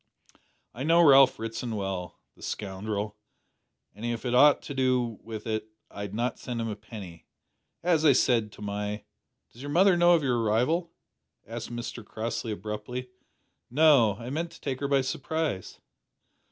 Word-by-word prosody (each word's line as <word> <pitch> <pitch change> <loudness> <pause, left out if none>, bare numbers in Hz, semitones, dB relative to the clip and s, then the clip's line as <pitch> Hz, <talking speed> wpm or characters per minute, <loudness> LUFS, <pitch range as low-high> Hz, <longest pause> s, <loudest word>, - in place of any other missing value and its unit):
"I 120 - -8
know 165 +4 +5
Ralph 135 -2 +7
Ritson 115 +1 -4
well, 95 -3 -4 0.2
the - - -20
scoundrel, 105 +1 -4 0.8
an' 105 - -12
if 120 +1 -3
I - - 0
had - - -1
aught 145 +3 +6
to - - -6
do 125 -4 +1
wi' 110 0 -6
it 110 -1 -2 0.2
I'd 100 0 -6
not 120 +3 -1
send 120 -2 -4
him 115 0 -2
a 105 - -3
penny. 100 -5 -11 0.6
As 165 -3 +3
I 145 -3 +7
said 115 -4 +2
to 105 - -11
my 105 +1 -3 0.2
" - - -54
"Does 120 - -13
your 145 - -6
mother 185 +4 +5
know 175 0 +6
of 160 - 0
your 125 -3 +1
arrival?" 125 +11 +1 0.5
asked 115 +1 -6
Mr 120 -1 -5
Crossley 110 +1 -4
abruptly. 110 +4 -5 0.6
"No; 135 -7 +5
I 120 +4 -7
meant 165 +4 -2
to - - -14
take 130 -2 -3
her 140 - -1
by 140 -1 +3
surprise." 135 - -3
120 Hz, 170 wpm, -28 LUFS, 105-140 Hz, 0.8 s, Ralph